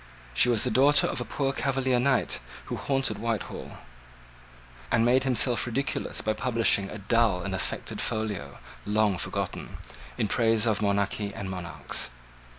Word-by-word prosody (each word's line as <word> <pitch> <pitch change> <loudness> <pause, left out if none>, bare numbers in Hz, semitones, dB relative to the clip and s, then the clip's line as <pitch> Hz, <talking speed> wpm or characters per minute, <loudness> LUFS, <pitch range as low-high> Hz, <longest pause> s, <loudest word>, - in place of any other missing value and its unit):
She 125 - +4
was 115 -4 +3
the 125 - +1
daughter 140 +6 +5
of - - -2
a - - -3
poor 135 -1 -1
Cavalier 130 -2 +1
knight 130 - +2 0.3
who - - -4
haunted 135 -4 0
Whitehall, 115 -1 -4 1.1
and 115 -1 +3
made 130 +2 +3
himself 125 -3 +2
ridiculous 135 +4 -2
by 110 - 0
publishing 115 -5 +1
a - - -6
dull 105 -3 +2
and 100 0 -3
affected 95 - -3
folio, 105 -11 -3 0.3
long 105 -3 +1
forgotten, - - -4 0.4
in - - +1
praise 115 +1 +2
of 110 -2 +1
monarchy 100 0 0
and 95 -1 -5
monarchs. 85 -9 -4
115 Hz, 150 wpm, -27 LUFS, 100-125 Hz, 1.1 s, daughter